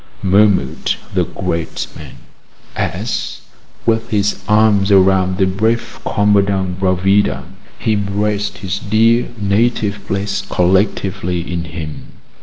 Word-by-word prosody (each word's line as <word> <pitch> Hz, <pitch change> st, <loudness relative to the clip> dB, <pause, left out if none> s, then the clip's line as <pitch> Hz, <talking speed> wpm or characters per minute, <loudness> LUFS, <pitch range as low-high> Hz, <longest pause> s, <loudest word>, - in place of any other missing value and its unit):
murmured 95 Hz, -7 st, +2 dB, 0.2 s
the -, -, +2 dB
great 85 Hz, -1 st, -3 dB
man, -, -, -10 dB, 0.6 s
as, -, -, -3 dB, 0.4 s
with 115 Hz, -1 st, +1 dB
his 105 Hz, -1 st, 0 dB
arms 105 Hz, -2 st, +3 dB
around 95 Hz, -1 st, +4 dB
the 95 Hz, -, +3 dB
brave 110 Hz, +5 st, -1 dB
Commandant 100 Hz, -3 st, +1 dB
Bravida, 95 Hz, -6 st, +2 dB, 0.3 s
he 110 Hz, -, 0 dB
embraced 100 Hz, 0 st, -1 dB
his 95 Hz, +1 st, -4 dB
dear 115 Hz, +4 st, +2 dB
native 105 Hz, 0 st, 0 dB
place 100 Hz, 0 st, -2 dB
collectively 95 Hz, -1 st, +1 dB
in 85 Hz, 0 st, -4 dB
him. 80 Hz, -2 st, -8 dB
100 Hz, 105 wpm, -17 LUFS, 95-105 Hz, 0.6 s, around